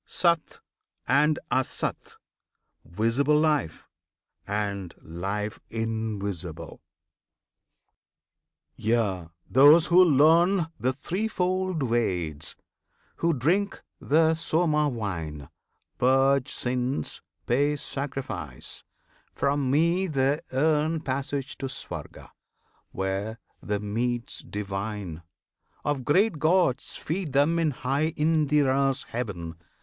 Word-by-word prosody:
SAT 170 Hz, -3 st, 0 dB, 0.5 s
and 150 Hz, +4 st, +3 dB
ASAT, 130 Hz, -, -2 dB, 0.7 s
Visible 115 Hz, +10 st, +1 dB
Life, 150 Hz, -, 0 dB, 0.6 s
And 100 Hz, -3 st, -3 dB
Life 100 Hz, +6 st, -4 dB
Invisible! 100 Hz, -7 st, -4 dB, 1.9 s
Yea! 105 Hz, -6 st, 0 dB, 0.2 s
those 145 Hz, +5 st, +7 dB
who 180 Hz, +1 st, +6 dB
learn 165 Hz, +3 st, +4 dB
The 125 Hz, +4 st, +1 dB
threefold 185 Hz, +2 st, -1 dB
Veds, 90 Hz, -, -1 dB, 0.6 s
who 170 Hz, -, +2 dB
drink 170 Hz, -, 0 dB, 0.2 s
the 160 Hz, +2 st, +3 dB
Soma 155 Hz, -2 st, +1 dB
wine, 85 Hz, -, -5 dB, 0.5 s
Purge 135 Hz, +1 st, +3 dB
sins, 125 Hz, +2 st, -2 dB, 0.2 s
pay 145 Hz, +5 st, +2 dB
sacrifice 135 Hz, -, -5 dB, 0.5 s
from 140 Hz, -1 st, +1 dB
Me 170 Hz, +7 st, +2 dB
they 140 Hz, -1 st, +1 dB
earn 155 Hz, +3 st, +1 dB
Passage 135 Hz, 0 st, -3 dB
to 135 Hz, -, -2 dB
Swarga; 135 Hz, -, -8 dB, 0.6 s
where 95 Hz, +4 st, -3 dB, 0.2 s
the 105 Hz, -1 st, -2 dB
meats 120 Hz, +4 st, -2 dB
divine 100 Hz, -4 st, -5 dB, 0.6 s
Of 145 Hz, -3 st, -1 dB
great 180 Hz, +2 st, +3 dB
gods 160 Hz, -5 st, +2 dB
feed 165 Hz, -3 st, -3 dB
them 150 Hz, +5 st, +3 dB
in 165 Hz, -2 st, +2 dB
high 140 Hz, +4 st, -1 dB
Indra's 145 Hz, -3 st, +2 dB
heaven. 90 Hz, -9 st, -5 dB
135 Hz, 90 wpm, -26 LUFS, 105-155 Hz, 1.9 s, those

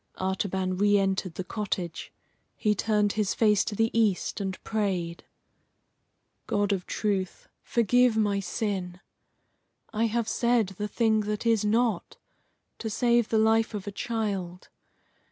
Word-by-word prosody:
Artaban 190 Hz, -1 st, -1 dB
re 205 Hz, +1 st, +4 dB
entered 190 Hz, -3 st, -1 dB
the 185 Hz, -, -3 dB
cottage. 185 Hz, -4 st, -4 dB, 0.4 s
He 210 Hz, -, +1 dB
turned 210 Hz, 0 st, +1 dB
his 210 Hz, -3 st, 0 dB
face 210 Hz, -3 st, +4 dB
to 210 Hz, -, -3 dB
the 225 Hz, +2 st, +1 dB
east 215 Hz, -3 st, +1 dB
and 190 Hz, -1 st, -3 dB
prayed: 185 Hz, -6 st, -2 dB, 1.2 s
"God 205 Hz, 0 st, +1 dB
of 185 Hz, -2 st, -4 dB
truth, 195 Hz, -4 st, -2 dB
forgive 240 Hz, +1 st, +3 dB
my 205 Hz, -2 st, +2 dB
sin! 190 Hz, -2 st, -3 dB, 0.9 s
I 220 Hz, +1 st, +1 dB
have 230 Hz, 0 st, 0 dB
said 235 Hz, -4 st, +2 dB
the 210 Hz, -, -1 dB
thing 220 Hz, 0 st, +2 dB
that 210 Hz, +2 st, -3 dB
is 225 Hz, -2 st, +3 dB
not, 220 Hz, -2 st, 0 dB, 0.6 s
to 225 Hz, -, -3 dB
save 235 Hz, +1 st, +2 dB
the 225 Hz, -, +2 dB
life 220 Hz, 0 st, +3 dB
of 200 Hz, -, -5 dB
a 205 Hz, -, -4 dB
child. 195 Hz, -5 st, -3 dB
210 Hz, 135 wpm, -27 LUFS, 190-225 Hz, 1.2 s, re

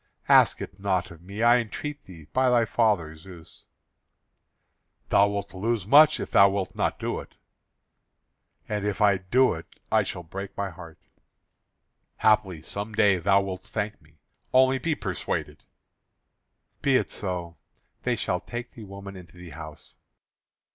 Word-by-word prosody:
"Ask -, -, +5 dB
it 95 Hz, -, -11 dB
not 95 Hz, -3 st, -1 dB
of 85 Hz, -1 st, -13 dB
me, 100 Hz, +5 st, -5 dB
I 120 Hz, +1 st, +6 dB
entreat 145 Hz, +6 st, -6 dB
thee, 85 Hz, -5 st, -13 dB
by 130 Hz, 0 st, +3 dB
thy 120 Hz, -2 st, +3 dB
father 100 Hz, -8 st, +1 dB
Zeus." 85 Hz, 0 st, -14 dB, 1.4 s
"Thou 100 Hz, -, +5 dB
wilt 100 Hz, -1 st, -4 dB
lose 105 Hz, +1 st, -1 dB
much 150 Hz, +7 st, +6 dB
if -, -, -5 dB
thou 100 Hz, 0 st, +7 dB
wilt 95 Hz, -1 st, -3 dB
not -, -, -1 dB
do -, -, -3 dB
it." -, -, -12 dB, 1.3 s
"And 105 Hz, -1 st, -2 dB
if 105 Hz, -1 st, -2 dB
I 100 Hz, -3 st, +4 dB
do 120 Hz, +8 st, +2 dB
it 80 Hz, +1 st, -11 dB
I -, -, +4 dB
shall 90 Hz, -, -5 dB
break 95 Hz, +4 st, -8 dB
my 100 Hz, -1 st, -2 dB
heart." 80 Hz, -1 st, -12 dB, 1.2 s
"Haply 105 Hz, -7 st, +2 dB
some 100 Hz, +5 st, -5 dB
day 100 Hz, -3 st, +4 dB
thou 100 Hz, +3 st, +3 dB
wilt 95 Hz, -1 st, -5 dB
thank 105 Hz, -1 st, -4 dB
me; 75 Hz, 0 st, -25 dB, 0.3 s
only 130 Hz, +1 st, +4 dB
be 160 Hz, +1 st, -1 dB
persuaded." -, -, -4 dB, 1.2 s
"Be 135 Hz, -2 st, +3 dB
it -, -, +1 dB
so; 90 Hz, -4 st, -5 dB, 0.4 s
they -, -, 0 dB
shall 90 Hz, -, -1 dB
take 120 Hz, +6 st, -7 dB
the 110 Hz, -, -11 dB
woman 100 Hz, 0 st, -9 dB
into 90 Hz, -1 st, -13 dB
the 90 Hz, -2 st, -11 dB
house." 75 Hz, +1 st, -11 dB
100 Hz, 155 wpm, -26 LUFS, 90-110 Hz, 1.4 s, thou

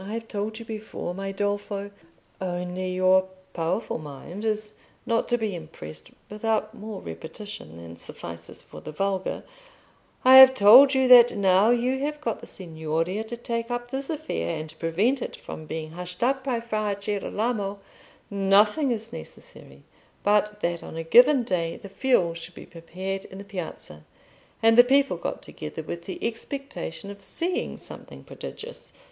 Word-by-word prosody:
I 200 Hz, +3 st, -6 dB
have 230 Hz, 0 st, -5 dB
told 215 Hz, +1 st, -3 dB
you 230 Hz, -, -8 dB
before, 215 Hz, -5 st, -5 dB
my 195 Hz, +1 st, -4 dB
Dolfo, 205 Hz, 0 st, -2 dB, 0.5 s
only 180 Hz, 0 st, -3 dB
your 185 Hz, 0 st, +4 dB, 0.3 s
powerful 170 Hz, +5 st, -2 dB
mind 155 Hz, +7 st, -8 dB
is 215 Hz, -1 st, -1 dB, 0.3 s
not 230 Hz, 0 st, 0 dB
to 240 Hz, -, +3 dB
be 220 Hz, -4 st, -2 dB
impressed 80 Hz, -, -8 dB, 0.2 s
without 215 Hz, 0 st, -1 dB
more 215 Hz, -3 st, -7 dB
repetition 160 Hz, -, -8 dB
than 85 Hz, 0 st, -10 dB
suffices 85 Hz, 0 st, -9 dB
for -, -, -12 dB
the -, -, -7 dB
vulgar—I 255 Hz, -, 0 dB
have 260 Hz, 0 st, +11 dB
told 260 Hz, +6 st, +8 dB
you 265 Hz, -1 st, +3 dB
that 240 Hz, -3 st, +8 dB
now 195 Hz, +2 st, +4 dB
you 245 Hz, +2 st, +2 dB
have 295 Hz, +2 st, -2 dB
got 235 Hz, -8 st, -2 dB
the -, -, -10 dB
Signoria 165 Hz, +3 st, -3 dB
to 235 Hz, +2 st, -6 dB
take 230 Hz, 0 st, -3 dB
up 245 Hz, 0 st, -4 dB
this 270 Hz, 0 st, -4 dB
affair 285 Hz, -, -2 dB
and 155 Hz, 0 st, -7 dB
prevent 205 Hz, +11 st, +1 dB
it -, -, -4 dB
from 155 Hz, -, -9 dB
being 155 Hz, 0 st, -5 dB
hushed 180 Hz, +4 st, -5 dB
up 265 Hz, +2 st, +1 dB
by 250 Hz, -4 st, -1 dB
Fra 215 Hz, -3 st, -2 dB
Girolamo, 205 Hz, 0 st, -2 dB, 0.5 s
nothing 205 Hz, +8 st, +3 dB
is 230 Hz, 0 st, -2 dB
necessary -, -, -11 dB, 0.4 s
but 210 Hz, 0 st, +2 dB
that 170 Hz, 0 st, -1 dB
on -, -, -8 dB
a 165 Hz, -, -3 dB
given 245 Hz, -, +6 dB
day 170 Hz, -6 st, -1 dB
the 200 Hz, -, -11 dB
fuel 195 Hz, -6 st, +2 dB
should 165 Hz, +1 st, -9 dB
be -, -, -10 dB
prepared 190 Hz, +3 st, -6 dB
in 190 Hz, -, -11 dB
the 200 Hz, -, -7 dB
Piazza, 175 Hz, -, -7 dB, 0.6 s
and 225 Hz, +1 st, +6 dB
the -, -, +12 dB
people 275 Hz, +2 st, +3 dB
got -, -, -4 dB
together -, -, -7 dB
with -, -, -6 dB
the 350 Hz, -, -5 dB
expectation 230 Hz, -, -6 dB
of 200 Hz, 0 st, -12 dB
seeing 345 Hz, -, -3 dB
something -, -, -10 dB
prodigious. 475 Hz, +3 st, -9 dB
205 Hz, 160 wpm, -26 LUFS, 180-240 Hz, 0.6 s, the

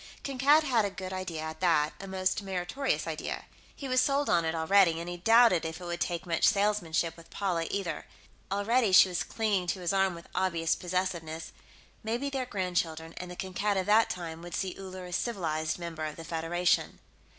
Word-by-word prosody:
Kankad 275 Hz, +3 st, +4 dB
had 245 Hz, -7 st, +2 dB
a 200 Hz, -, 0 dB
good 190 Hz, -1 st, -7 dB
idea, 185 Hz, -4 st, -4 dB
at 160 Hz, 0 st, -6 dB
that, 155 Hz, -4 st, +2 dB
a 195 Hz, -, -7 dB
most 190 Hz, +1 st, 0 dB
meritorious 195 Hz, +8 st, -2 dB
idea. -, -, -4 dB, 0.3 s
He 275 Hz, -, -6 dB
was 255 Hz, 0 st, +3 dB
sold 280 Hz, +1 st, +1 dB
on 170 Hz, -1 st, +3 dB
it, 160 Hz, 0 st, -1 dB
already, 165 Hz, 0 st, +4 dB
and 170 Hz, -, -6 dB
he 175 Hz, 0 st, -5 dB
doubted 225 Hz, -1 st, +5 dB
if 160 Hz, +1 st, -4 dB
it 180 Hz, -, -8 dB
would 175 Hz, 0 st, -4 dB
take 170 Hz, -1 st, -1 dB
much 165 Hz, -2 st, -1 dB
salesmanship 175 Hz, -5 st, +1 dB
with 165 Hz, -1 st, -15 dB
Paula, 175 Hz, -5 st, -1 dB
either. 195 Hz, -4 st, -3 dB, 0.4 s
Already, 210 Hz, +1 st, +2 dB
she 185 Hz, -, +8 dB
was 180 Hz, -, -1 dB
clinging 205 Hz, -5 st, -1 dB
to 185 Hz, -, -1 dB
his 175 Hz, +1 st, -1 dB
arm 195 Hz, -2 st, +2 dB
with 170 Hz, -, -12 dB
obvious 170 Hz, -3 st, +1 dB
possessiveness. 170 Hz, -3 st, -3 dB, 0.5 s
Maybe 240 Hz, +6 st, -2 dB
their 265 Hz, -2 st, -2 dB
grandchildren, 170 Hz, -5 st, -2 dB
and 180 Hz, -, -6 dB
the 180 Hz, -, -7 dB
Kankad 195 Hz, +2 st, -1 dB
of 190 Hz, -, 0 dB
that 215 Hz, +2 st, +4 dB
time, 165 Hz, -2 st, -5 dB
would 175 Hz, 0 st, -6 dB
see 190 Hz, -2 st, -2 dB
Uller 185 Hz, -1 st, -8 dB
a 180 Hz, -, -8 dB
civilized 160 Hz, -8 st, -1 dB
member 165 Hz, -3 st, -5 dB
of 155 Hz, -1 st, -5 dB
the 165 Hz, -, -9 dB
Federation.... 170 Hz, +2 st, 0 dB
180 Hz, 195 wpm, -29 LUFS, 165-200 Hz, 0.5 s, she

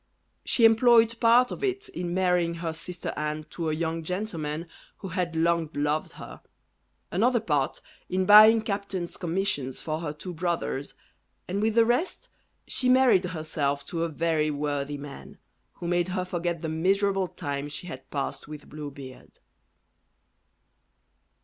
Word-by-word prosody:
She 235 Hz, -, +4 dB
employed 230 Hz, 0 st, +5 dB
part 240 Hz, +2 st, +5 dB
of -, -, -6 dB
it 395 Hz, +1 st, -1 dB
in 175 Hz, 0 st, -4 dB
marrying 180 Hz, -2 st, +1 dB
her 165 Hz, -1 st, -3 dB
sister 175 Hz, +2 st, -5 dB
Anne 150 Hz, 0 st, -3 dB
to 165 Hz, -2 st, -3 dB
a -, -, 0 dB
young 165 Hz, 0 st, -2 dB
gentleman 165 Hz, -3 st, -4 dB, 0.3 s
who 195 Hz, -, -7 dB
had 175 Hz, -1 st, -2 dB
long 165 Hz, -1 st, +1 dB
loved 150 Hz, +2 st, -1 dB
her; -, -, -10 dB, 0.7 s
another 240 Hz, +7 st, +3 dB
part, 150 Hz, -10 st, -1 dB, 0.3 s
in 185 Hz, 0 st, 0 dB
buying 215 Hz, +2 st, +8 dB
captains' 200 Hz, -4 st, -3 dB
commissions 170 Hz, -7 st, -2 dB
for 155 Hz, 0 st, -3 dB
her 165 Hz, -3 st, -3 dB
two 175 Hz, +4 st, -8 dB
brothers, 165 Hz, -5 st, -2 dB, 0.5 s
and 195 Hz, +3 st, -2 dB
with 220 Hz, 0 st, +1 dB
the 230 Hz, -1 st, +6 dB
rest 320 Hz, -, -1 dB, 0.4 s
she 255 Hz, -, 0 dB
married 250 Hz, -7 st, +5 dB
herself 155 Hz, -5 st, -2 dB
to 165 Hz, -1 st, -3 dB
a 170 Hz, -, -1 dB
very 160 Hz, -1 st, 0 dB
worthy 145 Hz, -1 st, -2 dB
man, 140 Hz, -1 st, -10 dB, 0.4 s
who 170 Hz, -, -7 dB
made 175 Hz, 0 st, +1 dB
her 185 Hz, 0 st, -2 dB
forget 175 Hz, -2 st, -3 dB
the -, -, -1 dB
miserable 195 Hz, +4 st, +1 dB
time 145 Hz, -2 st, -5 dB
she 150 Hz, +4 st, -6 dB
had 130 Hz, -6 st, -9 dB
passed 140 Hz, 0 st, -4 dB
with 150 Hz, -1 st, -9 dB
Blue 150 Hz, 0 st, -7 dB
Beard. 135 Hz, -2 st, -12 dB
170 Hz, 150 wpm, -27 LUFS, 150-200 Hz, 0.7 s, buying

